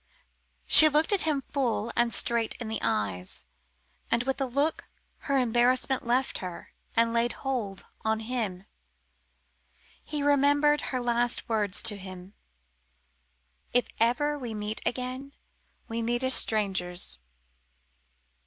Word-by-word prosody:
She 310 - +10
looked 305 +6 +2
at 385 -5 +2
him 280 -3 -1
full 235 -5 -1
and 240 0 +2
straight 230 -1 +1
in 235 -3 -7
the 220 - -3
eyes, 95 -3 -2 0.6
and 235 +1 +1
with 270 +1 -1
the 270 -1 -1
look 285 +6 -1 0.4
her 275 - +3
embarrassment 250 +1 +1
left 255 +3 0
her 180 -2 -8 0.2
and 230 0 +2
laid 235 0 +1
hold 220 -8 -3 0.2
on 220 0 0
him. 220 -6 -4 1.4
He 295 -2 -4
remembered 290 +1 +3
her 255 - -2
last 240 0 0
words 210 -4 0
to 220 -3 +1
him 185 0 -10 1.4
"If 245 - +2
ever 290 +6 +1
we 235 -4 -5
meet 210 +1 -4
again, 255 +2 -4 0.5
we 230 0 -3
meet 240 +2 -1
as 260 0 +3
strangers." 180 - 0
240 Hz, 125 wpm, -27 LUFS, 215-270 Hz, 1.4 s, She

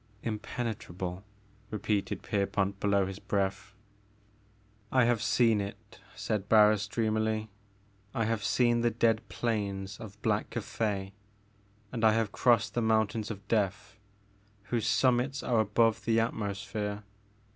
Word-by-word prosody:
''Impenetrable," 105 -5 -4 0.5
repeated 105 -1 -2
Pierpont 100 -1 -1
below 100 -1 +2
his 95 +1 -6
breath. 95 0 -2 1.2
"I 130 -2 +4
have 120 -2 +2
seen 115 -1 +3
it," 100 0 -9 0.2
said 105 -2 -2
Barris 105 -1 +5
dreamily. 110 0 -1 0.6
"I 115 - 0
have 110 -1 -1
seen 120 +4 +2
the 120 - +3
dead 115 -1 +2
plains 100 -3 -2
of 105 -3 -10
Black - - +1
Cathay 100 -3 -3 0.8
and 115 -2 -4
I 110 -1 +6
have 110 -2 0
crossed 115 -1 +3
the 120 - 0
mountains 110 0 +1
of 100 -2 -7
Death, 105 +1 -1 0.6
whose 115 +2 -1
summits 125 +4 +2
are 120 -2 +2
above 110 +1 +2
the 115 -1 +3
atmosphere. 105 -1 -3
110 Hz, 125 wpm, -30 LUFS, 100-115 Hz, 1.2 s, I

